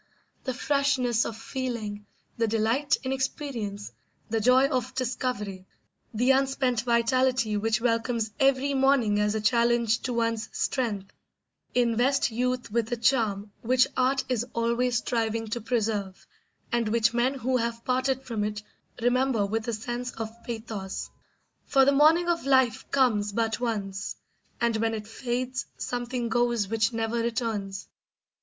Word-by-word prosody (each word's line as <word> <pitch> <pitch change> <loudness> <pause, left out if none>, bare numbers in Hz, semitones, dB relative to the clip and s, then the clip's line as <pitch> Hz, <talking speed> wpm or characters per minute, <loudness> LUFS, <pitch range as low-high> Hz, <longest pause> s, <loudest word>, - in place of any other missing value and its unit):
The 260 - -1
freshness 275 -4 +1
of 220 - -5
feeling, 225 -5 -4 0.3
the 230 -1 +1
delight 225 +6 +1
in 260 - -2
experience, 255 -7 -3 0.4
the 225 -1 +1
joy 255 +4 +5
of 255 -3 -2
discovery, 220 -7 -3 0.4
the 245 +4 +3
unspent 265 -3 +1
vitality 240 0 +2
which 220 +1 +1
welcomes 230 -1 0
every 275 +1 +3
morning 265 -6 +3
as 210 +1 +1
a 220 - -1
challenge 235 0 +3
to 250 - -3
one's 230 -1 -1
strength, 210 -7 -2 0.6
invest 245 +3 +2
youth 250 0 -1
with 230 +1 0
a 240 - 0
charm 220 -4 +1
which 250 +1 +4
art 260 +1 +2
is 245 -3 0
always 235 +1 +1
striving 225 -1 -1
to 235 +2 -3
preserve, 215 -4 -2 0.5
and 235 -3 +1
which 225 0 +2
men 245 +3 +1
who 255 0 0
have 235 -1 -3
parted 260 +1 0
from 230 -5 -3
it 210 0 -3 0.4
remember 245 -3 +2
with 220 +3 -2
a 235 - -1
sense 240 +3 -4
of 225 -1 -5
pathos; 220 -4 -5 0.6
for 270 -1 +5
the 280 - +5
morning 310 +5 +5
of 335 -5 0
life 260 -4 +3
comes 220 -7 +2
but 225 +1 -1
once, 200 -5 -3 0.4
and 235 -1 +1
when 225 0 0
it 215 -1 -6
fades 255 +3 -3
something 245 0 -3
goes 235 -2 +1
which 225 +1 +1
never 225 0 -1
returns. 225 -4 -2
235 Hz, 145 wpm, -27 LUFS, 220-255 Hz, 0.6 s, joy